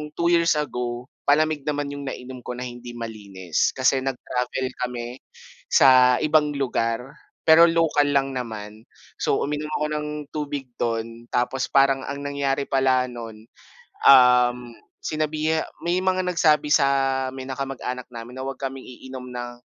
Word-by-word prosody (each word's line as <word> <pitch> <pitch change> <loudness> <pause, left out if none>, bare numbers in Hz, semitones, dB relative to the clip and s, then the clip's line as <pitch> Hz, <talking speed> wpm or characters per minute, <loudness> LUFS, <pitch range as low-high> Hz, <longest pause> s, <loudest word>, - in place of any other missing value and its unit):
2 170 0 +1
years 170 -1 +4
ago, 125 -4 -3 0.2
palamig 155 0 +2
naman 145 -1 -2
'yong 140 -1 -6
nainom 130 -1 -7
ko 125 - -4
na 125 - -5
hindi 120 0 -8
malinis 100 -7 -2
kasi 130 +1 +3
nag-travel 130 0 -3 0.2
kami 120 +1 -7 0.5
sa 125 -1 +6
ibang 150 -1 +3
lugar 125 -2 -1 0.4
pero 160 +1 +8
local 165 -3 +2
lang 135 -1 +1
naman. 110 -3 -6 0.4
So, - - +1
uminom 150 +1 -3
ako 150 - 0
ng 150 0 -3 0.3
tubig 145 -3 -4
do'n 115 0 -3
tapos 125 +2 0
parang 135 -1 +4
ang 140 0 -5
nangyari 140 -1 -1
pala 130 -2 +2
no'n, 115 -3 -9 0.6
um, 125 -2 +7 0.5
sinabiha 155 +1 -1 0.2
may 175 +1 +1
mga 185 0 +1
nagsabi 155 -4 +2
sa 140 -2 +5 0.5
may 130 - -6
na 130 - -4
kamag-anak 125 -2 -4
namin 120 +1 -9
na - - -4
'wag 135 -1 -6
kaming 135 -1 -5
iinom 125 0 -9
ng, 120 0 -5
135 Hz, 145 wpm, -23 LUFS, 125-145 Hz, 0.6 s, pero